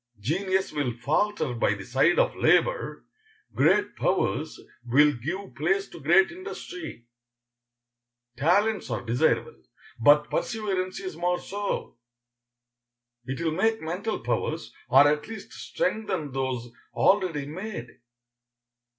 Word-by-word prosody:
Genius 190 - 0
will 145 -5 -1
falter 150 - 0
by 115 -3 +1
the 95 -1 -9
side 135 +8 +3
of - - +2
labor, - - +2 0.5
great - - +3
powers - - 0 0.2
will 145 +5 +4
give 175 - -5
place 195 +6 0
to - - -12
great 175 +7 +4
industry. 355 - -8 1.3
Talents 200 - +2
are - - -3
desirable, 120 +2 +1 0.4
but 145 +5 +5
perseverance 195 -5 -2
is 185 -4 -6
more 175 +1 0
so. 200 -11 -4 1.3
It 135 +1 -4
will 165 -1 0
make 220 +7 +1
mental 180 +7 -3
powers, 120 +1 -2 0.2
or 135 +3 +7
at 150 0 0
least 225 0 -9
strengthen 205 - -2
those 130 -3 -3 0.2
already 180 -8 +2
made. 165 - -6
165 Hz, 115 wpm, -26 LUFS, 135-200 Hz, 1.3 s, or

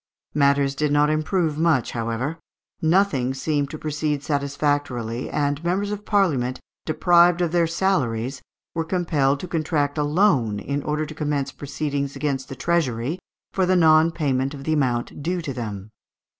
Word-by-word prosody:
Matters 140 -1 +3
did 150 +1 0
not 145 +1 +3
improve 155 0 0
much, 160 -8 +2
however; 115 +7 -3 0.4
nothing 160 -7 +2
seemed 145 0 -1
to 155 - -6
proceed 150 -1 -2
satisfactorily, 140 -5 -1
and 145 +1 -1
members 195 +4 0
of 210 0 -5
Parliament, 145 - +1 0.3
deprived 175 +2 +4
of 175 -2 0
their 170 -1 +3
salaries, 135 -9 0 0.3
were 165 - -1
compelled 155 -6 +1
to 180 - -5
contract 155 -3 -1
a - - +2
loan, 145 - +2
in 140 +6 -3
order 150 +2 -1
to 155 - -8
commence 145 -3 -2
proceedings 140 -1 -3
against 135 -3 -2
the 135 - -6
treasury 145 -1 -1 0.3
for 190 -2 +1
the 185 - +3
non 160 -1 +5
payment 140 -4 -1
of 135 - -9
the 155 - 0
amount 130 -2 -1
due 175 +4 -1
to 150 -5 -4
them. 105 -4 -6
150 Hz, 155 wpm, -23 LUFS, 135-165 Hz, 0.4 s, non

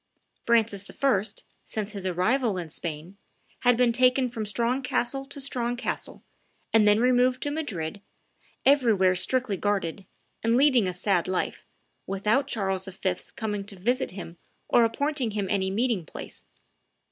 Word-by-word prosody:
Francis 225 -4 +2
I., 260 -9 +2 0.4
since 215 -1 -4
his 195 -3 -4
arrival 210 +5 +1
in 170 -3 -5
Spain, 165 +4 -5 0.4
had 245 -1 +4
been 245 -1 +4
taken 255 +1 +3
from 225 -3 -4
strong 235 +5 0
castle 270 +1 -1
to 280 +1 -10
strong 245 -3 -2
castle, 245 - -4 0.5
and 220 -2 +5
then 210 +1 +5
removed 250 +1 +3
to 290 - -1
Madrid, 200 - -4 0.6
everywhere 225 -10 +4
strictly 240 +2 0
guarded, 195 -2 -1 0.3
and 230 +1 +2
leading 260 -7 +4
a 180 - -2
sad 180 -2 +1
life, 185 0 -2 0.4
without 210 +8 +1
Charles 195 -6 -1
V.'s 190 -1 -3
coming 210 -2 -3
to 200 0 -10
visit 245 +8 0
him 175 -3 -9 0.3
or 240 - +5
appointing 275 +2 -1
him 200 -2 -1
any 190 -2 +1
meeting 220 -1 0
place. - - -9
220 Hz, 145 wpm, -27 LUFS, 190-250 Hz, 0.6 s, and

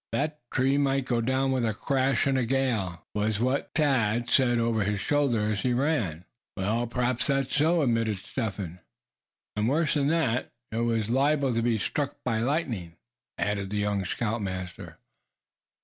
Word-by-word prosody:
"That 150 +1 -1
tree 135 +2 +2
might 135 -1 +1
go 120 -2 0
down 130 +3 +1
with 130 -2 +1
a 110 -2 0
crash 135 +3 +1
in 140 - +2
the 130 -1 +2
gale," 115 -9 -1
was 105 0 0
what 130 +4 0
Thad 120 -6 +1
said 120 -3 +4
over 115 -2 +1
his 105 0 -1
shoulder, 120 -6 +1
as 100 -2 -1
he 125 +2 +1
ran. 115 - 0 0.3
"Well, 110 +5 0
p'raps 125 +1 0
that's 135 -2 0
so," 160 +2 +3
admitted 115 -4 +1
Step 110 +2 -4
Hen. 90 -3 -6 0.8
"And 105 +2 +1
worse 150 +2 +2
than 140 -2 +1
that, 145 -7 +1 0.2
it 110 - -3
was 115 -2 0
liable 140 0 +2
to 115 - +1
be 115 -1 +2
struck 140 +6 -2
by 115 -3 +1
lightning," 115 - -2 0.4
added 100 -2 -1
the 105 - -2
young 105 -1 0
scoutmaster. 95 -3 -4
120 Hz, 165 wpm, -27 LUFS, 105-135 Hz, 0.8 s, said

